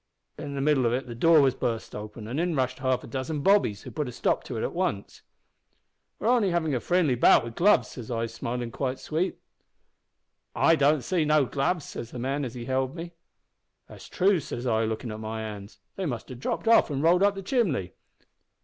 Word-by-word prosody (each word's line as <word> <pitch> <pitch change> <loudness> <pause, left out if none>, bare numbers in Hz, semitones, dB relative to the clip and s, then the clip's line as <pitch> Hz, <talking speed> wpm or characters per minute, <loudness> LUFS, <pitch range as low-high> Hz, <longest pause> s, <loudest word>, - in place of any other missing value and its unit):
In 145 -2 -6
the 135 - -2
middle 135 -4 +3
of 115 - +1
it 130 +1 -1
the 120 - -7
door 160 +6 +5
was 135 -2 +3
burst 115 -3 -3
open, 105 +1 -8
an' 130 +6 -3
in 175 -1 0
rushed 130 -1 -1
half 130 -1 0
a - - -9
dozen 135 +5 -3
bobbies, 190 - +3
who - - -9
put 150 -3 -3
a - - -6
stop - - 0
to 120 - -5
it - - -2
at - - -2
once. 170 - -3 1.0
"`We're - - -6
only 235 -4 +3
havin' 165 -4 0
a 125 - +1
friendly 175 -2 +2
bout 120 - +5
wi' 120 - -5
the 115 - -14
gloves,' 200 +4 +4
says 120 -4 -9
I, 115 -1 -1
smilin' 115 +1 -4
quite 130 +1 -2
sweet. 165 +4 -2 1.2
"`I 165 - +4
don't 145 -2 +3
see 175 +3 0
no 150 -2 +3
gloves,' 140 +5 -1
says 115 - -7
the 125 - -9
man 135 +4 -2
as 120 - -7
held 130 +3 -2
me. 170 0 -7 0.8
"`That's - - -12
true,' 190 -1 +2
says 125 -3 -6
I, 115 -2 +1
lookin' 110 +1 -4
at 110 - -6
my 110 0 -5
hands. 105 -2 -8 0.2
`They 185 -5 -1
must 120 -3 -5
have 125 -2 -8
dropped 135 - -3
off 230 -5 +5
an' 140 0 -2
rolled 175 +3 +4
up 200 0 +3
the 195 - -6
chimbly.' 175 - 0
135 Hz, 220 wpm, -27 LUFS, 120-165 Hz, 1.2 s, door